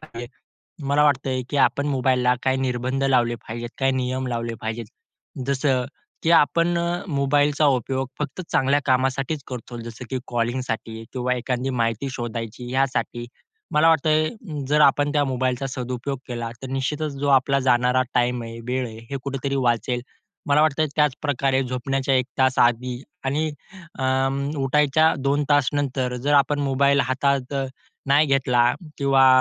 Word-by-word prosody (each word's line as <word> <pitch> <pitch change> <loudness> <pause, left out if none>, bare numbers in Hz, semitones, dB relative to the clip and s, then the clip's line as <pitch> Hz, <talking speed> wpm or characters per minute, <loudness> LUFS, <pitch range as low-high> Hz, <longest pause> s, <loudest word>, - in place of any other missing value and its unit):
पाहिजे. 120 -6 -8 0.6
मला 140 +2 +3
वाटतंय 130 -2 +1
की 145 - -2
आपण 140 +1 +2
मोबाईलला 125 -2 +2
काही 130 0 +2
निर्बंध 130 +1 -1
लावले 120 -3 +2
पाहिजेत. 120 +1 -5
काही 135 0 +2
नियम 130 0 -2
लावले 115 -1 -3
पाहिजेत. 110 +1 -4 0.6
जसं 135 -2 +1 0.4
की 165 - +1
आपण 170 +2 +4
अ, 170 +1 -1
मोबाईलचा 145 0 +2
उपयोग 130 0 0
फक्त 150 +5 -4
चांगल्या 135 +2 +3
कामासाठीच 135 +3 0
करतो 125 -1 -7
जसं 115 +1 -8
की 130 - -1
कॉलिंगसाठी 115 -2 -3
किंवा 125 -1 0
एखादी 125 +1 -2
माहिती 115 +3 0
शोधायची 120 0 -5
यासाठी. 130 -2 -1 0.5
मला 155 +2 +5
वाटतंय 155 0 +3 0.4
जर 150 +1 +3
आपण 145 0 +4
त्या 145 -1 +2
मोबाईलचा 130 0 -1
सदुपयोग 130 +1 -4
केला, 120 -2 -4
तर 130 - -6
निश्चितच 145 +3 -2
जो 145 - 0
आपला 135 0 +4
जाणारा 125 0 +3
टाईम 120 0 +1
आहे, 115 0 -8
वेळ 130 0 -1
आहे, 110 -1 -9
हे 140 - -2
कुठेतरी 140 0 -3
वाचेल. 125 -1 0 0.5
मला 145 +1 +4
वाटतंय 155 0 +2
त्याचप्रकारे 140 -2 +1
झोपण्याच्या 130 +2 -1
1 130 -1 +3
तास 130 -1 +3
आधी 120 +1 +2 0.2
आणि 150 +4 0 0.5
अं, 135 +1 0
उठायच्या 150 +3 +3
2 140 +2 +1
तासनंतर 135 -3 +1
जर 140 +4 0
आपण 145 +1 +3
मोबाईल 140 0 +3
हातात 135 +1 0 0.5
नाही 145 +3 +4
घेतला 125 -3 +3 0.3
किंवा 135 -1 +4
130 Hz, 145 wpm, -23 LUFS, 125-140 Hz, 0.6 s, मला